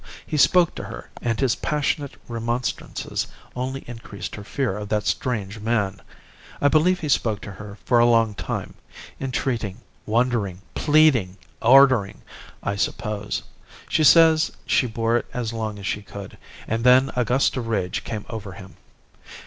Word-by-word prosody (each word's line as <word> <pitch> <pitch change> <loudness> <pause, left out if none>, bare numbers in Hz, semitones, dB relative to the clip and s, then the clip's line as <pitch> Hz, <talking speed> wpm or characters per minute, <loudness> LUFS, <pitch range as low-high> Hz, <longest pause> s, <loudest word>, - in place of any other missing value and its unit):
He 155 - -4
spoke 175 +3 +4
to - - -7
her, - - -9
and 115 -2 -1
his 130 -3 +2
passionate 145 -1 -1
remonstrances 120 +1 -3 0.3
only 130 +2 -3
increased 105 -6 -8
her 105 - -7
fear 125 -1 -2
of 105 -1 -6
that 105 -1 0
strange 105 -4 -2
man. 105 -3 -1 0.6
I 145 - +4
believe 175 +5 +3
he 155 - -3
spoke 110 -6 +1
to 105 - -8
her 100 +1 -10
for 120 - +4
a 120 - +6
long 115 -2 +3
time, - - -4 0.5
entreating, 120 -6 -2 0.3
wondering, 110 -5 0
pleading, 145 - +3 0.2
ordering, 130 -4 +5 0.4
I 100 0 -2
suppose. 105 0 -2 0.5
She 155 - +2
says 160 +1 +6
she 125 - +2
bore 115 +1 +1
it - - -4
as 115 -2 -2
long 110 -2 -3
as 100 - -8
she 105 - -2
could. 100 -1 -9 0.3
And 115 +1 -1
then 130 +2 +5
a 125 - +2
gust 125 +4 +2
of 120 -3 -3
rage 95 -5 -1
came 110 -2 -5
over 105 -5 -6
him. 95 0 -12
115 Hz, 155 wpm, -23 LUFS, 105-130 Hz, 0.6 s, a